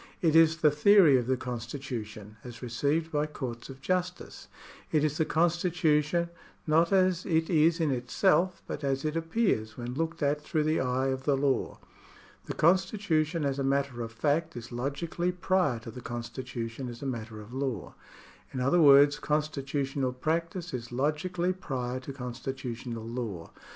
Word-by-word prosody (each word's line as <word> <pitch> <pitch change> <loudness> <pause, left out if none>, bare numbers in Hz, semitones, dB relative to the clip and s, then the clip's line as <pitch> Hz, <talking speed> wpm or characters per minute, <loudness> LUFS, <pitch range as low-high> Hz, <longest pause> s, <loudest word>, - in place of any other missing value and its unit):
It 160 -2 +2
is 165 0 +6
the 150 -2 +4
theory 165 0 +6
of 120 -1 -2
the 130 0 +1
constitu 125 0 -5
tion, 105 0 -12
as 120 -1 -10
received 145 +7 0
by 150 0 0
courts 125 -6 -6
of 135 0 -10
justice. 180 +3 -3 0.4
It 155 -2 +2
is 155 +2 0
the 160 - +3
constitution, 170 -1 +1 0.4
not 165 +3 +3
as 185 -2 +3
it 160 -1 0
is 165 +1 +4
in 160 -3 +1
itself, 175 +8 +1
but - - -6
as 135 +1 -1
it 155 +1 -1
appears 165 - 0
when 120 0 -5
looked 165 +3 -2
at 145 +1 +1
through 155 0 -1
the 155 +1 +1
eye 130 +1 0
of 130 0 -3
the 140 -2 +3
law. 135 -1 0 0.7
The - - -5
constitution 170 -3 +2
as 140 0 -1
a - - 0
matter 135 -2 0
of 115 -1 -5
fact 150 +6 0
is 120 +1 -8
logically 145 +8 -2
prior 180 -7 +1
to 115 - -8
the 125 - -9
constitution 120 +1 -5
as 120 +2 -9
a - - -4
matter 115 -4 -5
of 105 +3 -11
law. 130 -7 -3 0.6
In 130 - -4
other 140 +7 +3
words 145 0 +7
constitu 150 -2 -1
tional 130 -2 -3
practice 165 +3 -2
is 120 -1 -5
logically 170 +7 0
prior 130 -8 -4
to 130 +2 -8
constitutional 125 -2 -5
law. 115 -8 -5
140 Hz, 170 wpm, -29 LUFS, 125-165 Hz, 0.7 s, words